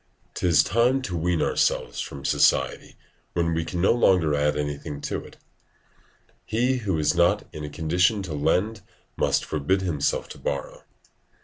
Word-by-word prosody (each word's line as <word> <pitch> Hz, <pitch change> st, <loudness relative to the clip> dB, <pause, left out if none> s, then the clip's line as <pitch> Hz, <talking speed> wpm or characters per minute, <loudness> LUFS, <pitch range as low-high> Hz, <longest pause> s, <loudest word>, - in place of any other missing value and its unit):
'Tis 85 Hz, -3 st, +3 dB
time 120 Hz, +6 st, +2 dB
to 100 Hz, -9 st, -5 dB
wean 85 Hz, 0 st, 0 dB
ourselves -, -, 0 dB
from 70 Hz, -1 st, -7 dB
society -, -, +1 dB, 0.4 s
when 85 Hz, -1 st, 0 dB
we 80 Hz, 0 st, 0 dB
can 85 Hz, +2 st, -5 dB
no 95 Hz, -, +4 dB
longer 90 Hz, -10 st, +3 dB
add 75 Hz, +1 st, +1 dB
anything 75 Hz, 0 st, -4 dB
to -, -, -4 dB
it; -, -, -15 dB, 1.1 s
he 125 Hz, +4 st, 0 dB
who 100 Hz, -8 st, -1 dB
is 75 Hz, +2 st, +2 dB
not 85 Hz, 0 st, +3 dB
in 75 Hz, -, -7 dB
a 75 Hz, -, -5 dB
condition 90 Hz, +7 st, +1 dB
to 85 Hz, -4 st, -5 dB
lend 90 Hz, +9 st, 0 dB, 0.3 s
must -, -, +1 dB
forbid 95 Hz, +6 st, 0 dB
himself 80 Hz, -6 st, -1 dB
to -, -, -11 dB
borrow. -, -, -4 dB
85 Hz, 155 wpm, -25 LUFS, 75-95 Hz, 1.1 s, no